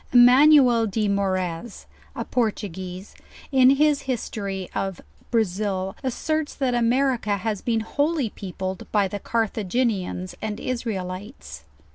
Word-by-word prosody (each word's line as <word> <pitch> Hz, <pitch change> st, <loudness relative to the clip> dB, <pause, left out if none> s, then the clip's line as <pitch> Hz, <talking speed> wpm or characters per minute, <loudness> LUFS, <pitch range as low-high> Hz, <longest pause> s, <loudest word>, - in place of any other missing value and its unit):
Emanuel 250 Hz, -1 st, +6 dB
de 210 Hz, +1 st, 0 dB
Moraez, 190 Hz, 0 st, -2 dB, 0.3 s
a -, -, -4 dB
Portuguese, 190 Hz, -5 st, -3 dB, 0.4 s
in 260 Hz, -2 st, +6 dB
his 290 Hz, +1 st, +3 dB
history 200 Hz, -6 st, -3 dB
of 195 Hz, -2 st, -3 dB, 0.3 s
Brazil, 195 Hz, -3 st, -1 dB
asserts 310 Hz, +4 st, -2 dB
that 260 Hz, -3 st, 0 dB
America 240 Hz, -3 st, +1 dB
has 210 Hz, 0 st, -3 dB
been 225 Hz, -2 st, 0 dB
wholly 285 Hz, +1 st, 0 dB
peopled 190 Hz, -1 st, -6 dB
by 205 Hz, -2 st, +3 dB
the 205 Hz, +2 st, -5 dB
Carthaginians 210 Hz, -4 st, -1 dB
and 215 Hz, 0 st, -4 dB
Israelites. 185 Hz, -, -5 dB
215 Hz, 110 wpm, -24 LUFS, 190-250 Hz, 0.4 s, Emanuel